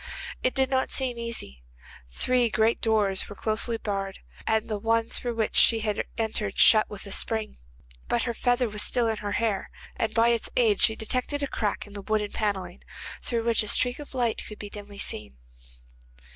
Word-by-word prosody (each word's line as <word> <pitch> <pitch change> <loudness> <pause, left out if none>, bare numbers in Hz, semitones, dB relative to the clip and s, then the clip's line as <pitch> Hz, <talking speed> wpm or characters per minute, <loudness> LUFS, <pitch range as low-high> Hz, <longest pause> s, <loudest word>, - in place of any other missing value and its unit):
It 255 - +1
did 265 0 +2
not 260 0 +2
seem 250 -3 -1
easy. 230 - -4 0.5
The - - -20
three 250 -2 +2
great 220 +1 +2
doors 210 -4 +2
were 205 - -8
closely 220 +3 0
barred, 195 -3 -3 0.3
and 220 0 +2
the 215 -2 -2
one 225 +2 +2
through 240 0 -4
which 225 -1 -1
she 225 -1 +5
had 210 -1 -1
entered 215 -3 -1
shut 215 -1 +6
with 210 0 -8
a 200 - -7
spring, 220 - 0 0.5
but 235 - +1
her 235 - -1
feather 245 +1 +2
was 210 -1 -1
still 240 -2 +2
in 220 -1 0
her 205 -1 -3
hair, 220 -3 0 0.3
and 225 - -1
by 230 0 +5
its 235 -1 0
aid 220 -5 +4
she 220 - +4
detected 255 +6 -2
a - - +1
crack 210 -5 -2
in 205 - -14
the 200 - -5
wooden 210 0 -1
panelling, 205 -3 -2 0.4
through 235 -2 0
which 230 -1 +3
a 215 - -3
streak 245 +5 +1
of 290 -2 -9
light 240 -3 +1
could 210 - -9
be 205 -1 -7
dimly 205 -1 -9
seen. 105 - -6
220 Hz, 200 wpm, -27 LUFS, 205-235 Hz, 0.5 s, shut